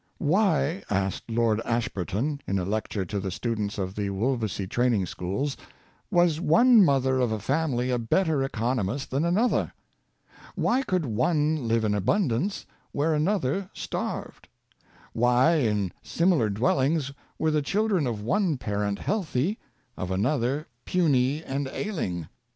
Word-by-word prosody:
Why," 165 -1 +1
asked 95 +2 -1
Lord 115 -1 +1
Ashburton 115 - -2
in 100 - 0
a 90 - -1
lecture 105 -1 -2
to 100 +3 -3
the 95 0 -3
students 105 +1 -3
of 95 -2 -3
the 100 -1 -2
Wolvesey 110 -1 -1
training 120 -3 +1
schools, 100 +13 -3 0.3
" - - -35
was 170 -2 +3
one 230 +6 +6
mother 130 -4 +2
of 125 -3 +1
a 110 - 0
family 130 +1 0
a 125 - +1
better 155 +5 +1
economist 120 0 -2
than 135 +4 +1
another? 195 +9 +1 0.8
Why 255 +3 +2
could 185 - -1
one 150 +4 +1
live 115 0 +2
in 105 -1 +1
abundance 140 - 0 0.3
where 155 +3 +1
another 180 +2 0
starved? - - -5 0.7
Why, 125 +7 +4
in 105 - 0
similar 170 - +2
dwellings, 135 +7 +1 0.3
were 160 - +1
the 150 -1 +2
children 195 -1 +1
of 110 -4 -3
one 180 - +1
parent 105 -3 -2
healthy, 190 - -1 0.4
of 90 - -4
another 125 +8 0 0.2
puny 145 -4 +1
and 140 -1 -3
ailing? 115 - -3
130 Hz, 140 wpm, -26 LUFS, 110-160 Hz, 0.8 s, one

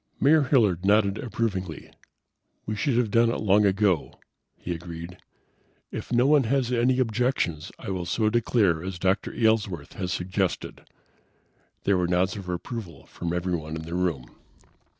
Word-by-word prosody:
Mayor 155 +3 +5
Hilliard 105 - +3
nodded 100 0 +3
approvingly. 100 -8 -3 0.7
"We 110 - -3
should 120 +3 0
have 120 -4 +1
done 115 +1 +4
it 115 - -1
long 105 0 +4
ago," 95 -5 +1 0.4
he 85 - -4
agreed. 85 +1 -8 0.7
"If - - -6
no 120 +1 +3
one 145 -2 +4
has 125 +1 +1
any 125 +1 +2
objections 115 - 0
I - - -6
will 90 -2 -3
so 110 -2 +1
declare 105 -8 +2
as 95 -1 -5
Dr. 95 +2 0
Aylesworth 105 -9 0
has 90 -2 -4
suggested." 95 0 -3 0.9
There 100 -2 +2
were 90 - +1
nods 90 +1 +1
of 95 -3 -7
approval 90 +1 -6
from 85 -1 -5
everyone 85 -3 -2
in 80 - -5
the 85 +1 -7
room. 85 -9 -1
95 Hz, 150 wpm, -26 LUFS, 90-115 Hz, 0.9 s, Mayor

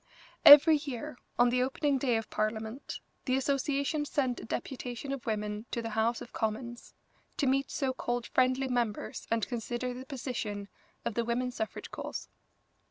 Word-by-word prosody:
Every 300 +2 +11
year, 250 -4 -6 0.2
on 245 0 +5
the 250 0 +2
opening 270 +2 +1
day 245 -3 +2
of 225 - -5
Parliament, 220 +4 -3 0.2
the 255 - +2
association 280 +2 0
sent 260 -4 0
a - - -8
deputation 250 +2 -4
of 275 -3 -5
women 210 0 -2
to - - -2
the 230 -1 -4
House 225 +2 +1
of - - -10
Commons, 235 +2 -3 0.4
to 285 - +1
meet 270 +1 +2
so 265 -2 -1
called 240 -2 -2
friendly 255 +1 +2
members 240 -4 -2
and 230 -1 +1
consider 240 +1 -3
the 255 +2 -8
position 220 -7 -4 0.4
of 235 - -1
the 235 - 0
women's 245 +2 -1
suffrage 220 -1 -4
cause. - - -6
245 Hz, 165 wpm, -31 LUFS, 230-270 Hz, 0.4 s, Every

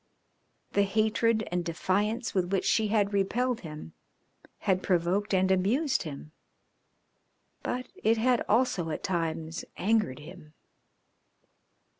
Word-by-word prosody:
The 200 - +3
hatred 220 +2 +1
and 175 0 0
defiance 205 +8 -1
with 185 -2 0
which 195 - +1
she 220 -1 +3
had 205 -1 +1
repelled 235 +5 +1
him 150 - -9 0.7
had 185 -1 +1
provoked 185 +3 +1
and 190 -1 +3
amused 235 - +2
him, 150 -1 -7 1.3
but 250 +1 -3 0.2
it 225 +2 +4
had 245 +1 +2
also 210 -7 +2
at 155 - -4
times 165 -2 -2
angered 210 - +1
him. 155 0 -12
195 Hz, 115 wpm, -29 LUFS, 175-220 Hz, 1.3 s, it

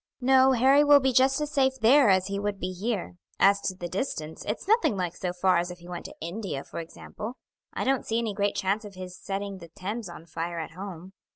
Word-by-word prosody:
"No; 265 +1 +5
Harry 265 +4 +5
will 290 -1 +7
be 265 -1 +1
just 265 +3 +4
as 300 0 -2
safe 265 -2 +2
there 245 +2 +6
as 190 -1 +4
he 200 +1 -3
would 205 -1 -2
be 185 +1 -3
here. 195 -2 -3 0.2
As 200 +1 +5
to 190 - -2
the 175 -1 -5
distance, 165 - -4
it's 210 - -4
nothing 440 - +3
like 180 -2 -2
so 180 - -3
far 180 0 +2
as 175 +1 -2
if 180 - -8
he 175 0 -14
went 175 -1 -6
to - - -9
India, 170 -4 -4
for - - -7
example. 210 +8 -8 0.4
I - - -2
don't 265 0 +1
see 225 - 0
any 230 -3 -1
great 200 0 0
chance 200 +3 0
of 205 -2 -10
his 185 -1 -8
setting 195 0 -5
the 170 - -11
Thames 200 +5 -5
on 170 -1 -10
fire 170 +1 -4
at 160 -1 -5
home. 185 0 -8
200 Hz, 240 wpm, -27 LUFS, 180-240 Hz, 0.4 s, will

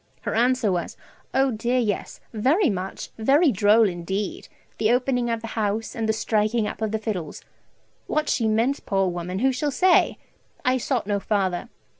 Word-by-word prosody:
Her - - -3
answer 240 -2 +2
was, 175 -1 -3 0.3
"Oh 265 0 +2
dear 240 +3 -1
yes, 215 -5 -2
very 270 - +2
much, 190 0 -5
very 280 +7 +4
droll 210 +1 +4
indeed, 190 +3 -4 0.3
the 215 - +3
opening 245 -1 +1
of 230 -1 -1
the 230 - -6
house, 215 0 -2
and 225 -1 -2
the - - +6
striking 215 +1 0
up - - -7
of 220 -1 -1
the 220 - 0
fiddles!" 200 -8 -5 0.6
What 305 0 0
she 225 - +1
meant, 230 +6 +1
poor 195 -1 +2
woman, 175 +1 -4
who 265 - +4
shall 265 +3 -1
say? 365 +6 +3 0.5
I 255 +1 +3
sought 250 -3 -1
no 200 0 0
farther. 195 -2 -1
220 Hz, 175 wpm, -24 LUFS, 205-255 Hz, 0.6 s, the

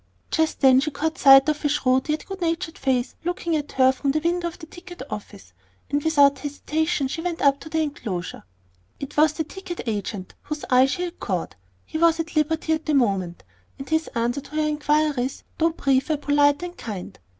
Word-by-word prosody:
Just 320 0 0
then 260 -2 +6
she 305 +3 0
caught 320 +3 -3
sight 270 0 +8
of 305 -1 -1
a 295 - +2
shrewd, 265 -1 +1
yet 305 0 -1
good 385 -1 -8
natured 330 0 -2
face 255 -2 -1
looking 340 -1 -1
at 295 -1 -3
her 260 0 +5
from 275 +1 -3
the 300 +3 +2
window 345 +1 0
of 340 - -7
the 320 - -10
ticket 350 -1 -11
office; 95 - -8 0.4
and 285 0 0
without 285 -3 +4
hesitation 295 +1 -1
she 325 +5 -4
went 345 -1 -3
up 280 0 +4
to 315 - -10
the 320 0 0
enclosure. 205 - -5 0.6
It 280 0 -7
was 305 0 +4
the 320 - -2
ticket 355 +2 -7
agent 205 -3 -4
whose 300 0 -6
eye 255 +1 +6
she 320 +6 -2
had 355 0 -6
caught. 180 - -3 0.3
He 315 - -5
was 335 0 +4
at 330 +1 -4
liberty 315 +1 +1
at 315 0 -3
the 305 - +2
moment, 195 -9 0 0.3
and 270 - -8
his 315 0 0
answers 240 +4 -1
to 305 - -11
her 310 0 +1
inquiries, 295 -3 0 0.2
though 330 +1 +4
brief, 275 -3 0
were 310 - +1
polite 290 +1 +2
and 355 0 -6
kind. 205 - -7
295 Hz, 205 wpm, -23 LUFS, 265-320 Hz, 0.6 s, sight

